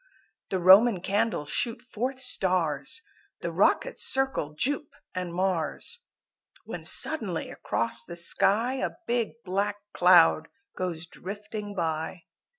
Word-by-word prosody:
The 190 - 0
Roman 190 +4 +7
Candles 200 -6 -1
shoot 230 -1 -1
forth 255 +2 -4
stars, 185 - +1 0.4
The - - -3
rockets - - +2
circle 265 - +1
Jupe 285 - -2 0.2
and 180 -1 -4
Mars, 180 - -2 0.7
When - - -7
suddenly 210 - +1
across 115 - -2
the 170 - -9
sky 225 +8 +2
A - - -3
big 235 -2 0
black 200 +2 0 0.2
cloud 175 -3 +5 0.3
goes 175 -3 -4
drifting 205 +3 -7
by. 160 0 -3
190 Hz, 115 wpm, -27 LUFS, 170-230 Hz, 0.7 s, Roman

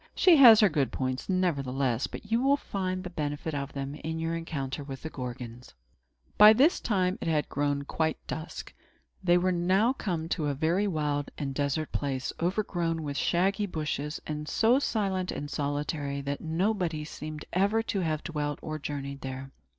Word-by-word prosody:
She 360 -3 +6
has 235 -6 +9
her 210 - +7
good 145 -5 0
points, 130 +3 -3
nevertheless; 140 -9 0
and - - -6
you 225 +3 +1
will 275 +2 +4
find 185 -7 -3
the 180 - -6
benefit 150 -1 -3
of 140 -1 -4
them, 140 0 -4
in 160 +2 -5
your 165 +1 -2
encounter 145 -4 -4
with 135 -2 -8
the 160 - -5
Gorgons." 125 - -7 0.6
By 210 +1 +10
this 280 - +4
time 185 -4 0
it - - -3
had 155 -2 +1
grown 145 0 0
quite 160 +2 -1
dusk. 160 +1 -6 0.5
They 175 -1 +5
were 185 +1 +2
now 185 +7 +2
come 170 -10 -3
to 155 -4 -1
a 140 - -1
very 170 +8 +1
wild 150 -5 -1
and 135 -2 -3
desert 145 +2 -1
place, 135 -3 -2
overgrown 175 -3 -1
with 145 -1 -4
shaggy 195 +7 +1
bushes, 150 -3 -3
and 150 0 -4
so 235 +4 +4
silent 195 -8 -1
and 145 +1 -5
solitary 145 -1 -2
that 140 +1 -4
nobody 170 -2 -1
seemed 155 0 -7
ever 200 +5 +2
to 210 -3 -2
have 155 -4 -1
dwelt 150 -3 -2
or 155 0 -4
journeyed 140 -1 -5
there. 135 0 -6
155 Hz, 175 wpm, -29 LUFS, 140-185 Hz, 0.6 s, By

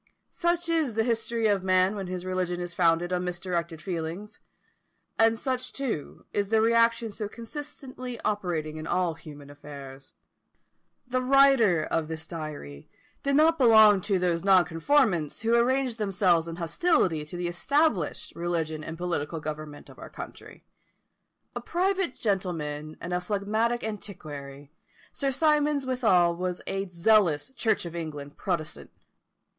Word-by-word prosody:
Such 345 0 0
is 320 -8 0
the 225 - +2
history 230 0 -1
of 205 -3 +3
man 185 +1 +3
when 195 -2 -4
his 180 0 -5
religion 185 -1 -2
is 175 -1 -4
founded 175 +1 +2
on 180 0 0
misdirected 175 -2 -3
feelings; 180 +3 -5 0.8
and 225 0 +4
such, 255 +1 -3
too, 250 - -5
is 200 -1 0
the 220 0 +3
reaction 230 0 +3
so 205 0 -5
constantly 255 0 -8
operating 170 -7 -2
in 155 +1 -6
all 180 -2 +1
human 145 -3 -12
affairs. 140 -2 -11 0.9
The 255 0 -1
writer 255 - +5
of 160 -2 -1
this 160 0 -5
diary 150 - -8 0.3
did 280 0 +1
not 320 +2 +4
belong 220 -5 +7
to 200 0 0
those 175 -2 0
nonconformists 185 - +2
who 230 +1 +2
arranged 245 0 +2
themselves 190 -5 +2
in 165 - -5
hostility 175 - +1
to 150 +4 -8
the 175 0 -2
established 210 - 0
religion 165 -2 -2
and 165 +1 -6
political 165 -2 -2
government 150 -1 -7
of - - -15
our - - -9
country. - - -10 0.9
A - - -3
private 375 -3 0
gentleman 155 -7 -3
and 180 +1 -5
a 180 - 0
phlegmatic 215 +5 -1
antiquary, 145 -10 -7 0.4
Sir 275 - 0
Symonds 295 0 +2
withal 205 -10 +3
was 180 0 -3
a 195 0 -3
zealous 180 - +3
Church 230 -7 0
of 170 0 -7
England 150 -4 -6
protestant. 170 -5 -3
185 Hz, 140 wpm, -27 LUFS, 165-235 Hz, 0.9 s, belong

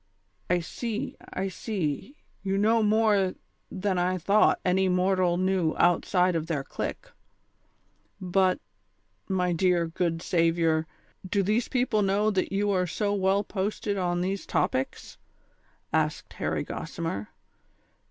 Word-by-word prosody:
" 100 0 -40
I - - -2
see, 240 +9 -4 0.2
I 190 +1 -2
see, 190 - -3 0.3
you 195 0 -1
know 220 +3 +3
more 210 -3 +3 0.3
than 190 -1 -1
I 180 +1 +1
thought 200 +5 +3
any 190 +1 +3
mortal 180 -1 +2
knew 185 -3 +1
outside 180 +1 +3
of 165 -1 -2
their 150 -5 -1
clique. - - -5 1.1
But, 185 0 +2 0.7
my 180 -2 +1
dear, 175 0 +2
good 165 0 -2
saviour, 165 -2 +2 0.4
do 200 0 +2
these 215 +5 +1
people 245 -4 +1
know 205 +2 +2
that 190 -2 -1
you 200 +1 +1
are 180 -2 +1
so 205 +4 -1
well 195 0 +2
posted 205 +1 -2
on 175 -2 0
these 190 +2 -2
topics? 130 +1 -2 0.3
" - - -39 0.3
asked - - 0
Harry - - -2
Gossimer. 135 -12 -4
185 Hz, 135 wpm, -27 LUFS, 175-205 Hz, 1.1 s, know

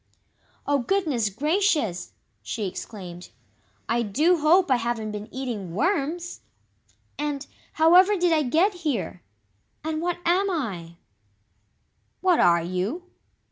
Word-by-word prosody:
"Oh, 285 0 +2
goodness 280 - 0
gracious!" 300 - 0 0.3
she 220 -3 -4
exclaimed. 180 -2 -7 0.6
"I 235 +1 +1
DO 300 - +2
hope 330 +2 +4
I 255 - +5
haven't 230 -2 -2
been 210 0 -6
eating 225 -10 -5
WORMS! 345 - -1 0.8
And, 295 -1 -2 0.3
however 365 +6 +6
did 350 -1 +2
I 310 - +3
get 320 - +2
here? 225 - -2 0.6
And 315 0 -2
what 350 0 -1
am 375 +4 +3
I?" 195 - -4 1.2
"What 365 -3 +3
are 170 -1 +4
you?" 195 - -3
285 Hz, 115 wpm, -25 LUFS, 210-345 Hz, 1.2 s, however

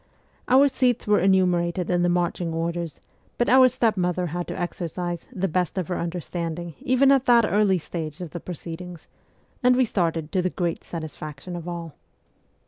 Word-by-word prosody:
Our 265 +3 +6
seats 250 -3 +1
were 210 -1 +4
enumerated 180 -1 +2
in 175 0 +2
the 175 - +2
marching 175 -1 -1
orders, 165 -2 -3 0.4
but 240 - +1
our 260 +1 +7
stepmother 185 -8 0
had 175 0 -3
to - - -5
exercise 175 0 -4
' - - -27
the 195 -5 -1
best 180 +1 -1
of 185 -3 -2
her 180 - -1
understanding 170 -1 -4
' - - -31
even 265 +2 +3
at 270 -2 +3
that 235 -2 +6
early 205 -2 +3
stage 160 -2 -6
of 175 -4 -6
the 175 - -5
proceedings, 175 0 -8 0.6
and 250 0 +5
we 255 0 +4
started 165 -7 -1
to 185 - +1
the 185 - 0
great 175 -2 -2
satisfaction 155 0 -7
of 170 0 -7
all. 170 -3 -5
175 Hz, 180 wpm, -24 LUFS, 170-205 Hz, 0.6 s, our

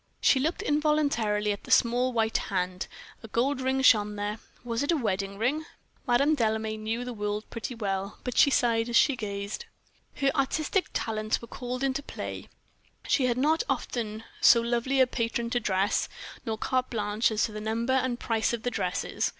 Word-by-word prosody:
She 265 - +4
looked 315 +6 -1
involuntarily 285 -9 +1
at 200 - -5
the - - -12
small 245 +2 +3
white 225 -2 +1
hand; 180 -2 -2 0.3
a 225 - -9
gold 255 +5 0
ring 265 +1 0
shone 210 -4 +5
there 205 +1 -3 0.2
was 235 -1 -2
it 285 - +1
a 330 - +2
wedding 200 -5 -2
ring? 265 +8 0 0.4
Madame 275 +5 +4
Delame 220 -3 -1
knew 225 +3 -2
the 250 - -5
world 210 0 -3
pretty 230 +2 -5
well, 195 -2 -3
but 250 - -4
she 280 - +6
sighed 235 -3 +2
as 235 - -2
she 275 +3 +5
gazed. 200 -3 -5 0.5
Her 275 -1 +2
artistic 310 +6 0
talents 215 -1 -1
were 235 - -10
called 250 +2 -5
into 270 +1 0
play; - - -7 0.6
she 260 -3 +3
had 240 -1 0
not 310 +5 +3
often 220 -2 -2 0.2
so 235 - +8
lovely 240 +3 0
a - - +7
patron 235 -1 -2
to 245 - +2
dress, 200 -2 +1 0.4
nor 220 -1 -1
carte 255 +2 0
blanche 210 0 +1
as 215 -2 0
to 225 - 0
the 215 0 -6
number 230 +4 -1
and 255 -2 +1
price 225 0 0
of 230 -2 -3
the 245 - -1
dresses. 180 -5 -1
235 Hz, 185 wpm, -28 LUFS, 215-260 Hz, 0.6 s, so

